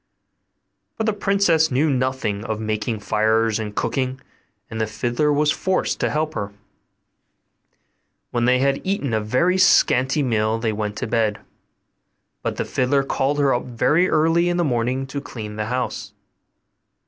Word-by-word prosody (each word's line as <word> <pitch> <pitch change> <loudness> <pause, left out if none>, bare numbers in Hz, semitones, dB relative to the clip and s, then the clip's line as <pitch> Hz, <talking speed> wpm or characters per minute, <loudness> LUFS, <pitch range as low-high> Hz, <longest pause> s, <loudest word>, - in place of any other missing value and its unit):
But 220 - -1
the 220 - +1
princess 195 -6 +2
knew 135 +5 +2
nothing 130 -6 -1
of 110 -2 -3
making 110 0 -2
fires 110 +1 +1
and 105 -1 -5
cooking, 130 0 -1 0.5
and 110 -1 -5
the 110 - 0
fiddler 120 +7 0
was 150 +1 +2
forced 190 +3 -1
to - - +1
help 155 +1 -1
her. 100 -7 -4 1.8
When 120 0 0
they 125 +1 +4
had 135 +1 +1
eaten 190 - -1
a 110 - +1
very 170 +13 +1
scanty 135 -5 +4
meal 110 -3 +1
they 115 -1 -1
went 105 -1 -3
to - - -3
bed; 110 -2 0 1.0
but - - -3
the - - -1
fiddler 135 +2 +1
called 135 +1 -1
her 140 -2 +3
up 120 - -1
very 150 +9 +2
early 165 +2 +3
in 175 - 0
the 175 - +2
morning 125 -1 0
to 140 +1 -5
clean 105 -6 -7
the 105 0 -3
house. 125 +2 -3
130 Hz, 160 wpm, -22 LUFS, 110-150 Hz, 1.8 s, they